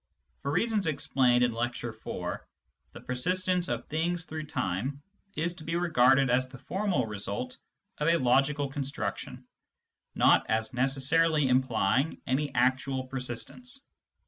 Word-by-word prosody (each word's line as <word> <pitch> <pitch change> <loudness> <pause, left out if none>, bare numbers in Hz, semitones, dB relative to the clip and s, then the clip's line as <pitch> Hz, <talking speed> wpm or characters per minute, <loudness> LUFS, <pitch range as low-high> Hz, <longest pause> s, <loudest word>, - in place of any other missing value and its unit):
For 140 - -3
reasons 205 +4 +1
ex 155 - -1
plained 125 -2 +3
in 120 - +3
Lecture 120 0 -3
IV., 110 - -5 0.5
the - - -11
persistence 180 +7 0
of - - -3
things 165 +2 -1
through 155 -1 -6
time 120 +7 -2 0.4
is 170 +2 -1
to 170 -3 -11
be 165 +1 -3
regarded 135 -6 +4
as 130 +1 +2
the 130 +1 -11
formal 180 - -1
result 105 +4 -4 0.4
of 150 - 0
a 170 0 +5
logical 140 +2 +2
construction, 140 0 -5 0.7
not - - +5
as 110 +3 0
necessarily 140 +4 +3
implying 130 +2 +1
any 140 +2 0
actual 130 +1 +1
per 130 +1 -5
sistence. 250 - -6
135 Hz, 140 wpm, -29 LUFS, 125-165 Hz, 0.7 s, a